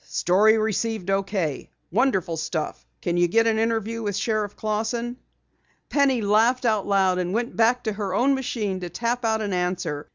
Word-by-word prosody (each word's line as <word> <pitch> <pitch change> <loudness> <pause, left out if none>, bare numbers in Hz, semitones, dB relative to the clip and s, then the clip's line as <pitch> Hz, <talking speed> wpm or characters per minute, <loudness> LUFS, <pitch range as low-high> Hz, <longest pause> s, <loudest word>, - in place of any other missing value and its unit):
"STORY 210 +5 +3
RECEIVED 220 -2 -1
OK. 195 -7 -1 0.2
WONDERFUL 190 -6 +1
STUFF. 160 0 -4 0.2
CAN 175 0 0
YOU 175 0 +4
GET 225 +6 +3
AN 225 -1 +2
INTERVIEW 225 0 -1
WITH 205 -3 -2
SHERIFF 215 -2 -1
CLAUSSON?" 225 +3 -2 0.7
Penny 275 -4 +2
laughed 225 +5 +3
aloud, 195 -4 +2
and 180 +2 -2
went 235 +1 -2
back 235 +2 +3
to 220 - -1
her 200 -2 -3
own 260 +6 +3
machine 220 -7 -2
to 180 -1 -5
tap 240 +5 -2
out 220 -1 +1
an 205 -2 -2
answer. 180 -5 -2
215 Hz, 165 wpm, -24 LUFS, 185-230 Hz, 0.7 s, YOU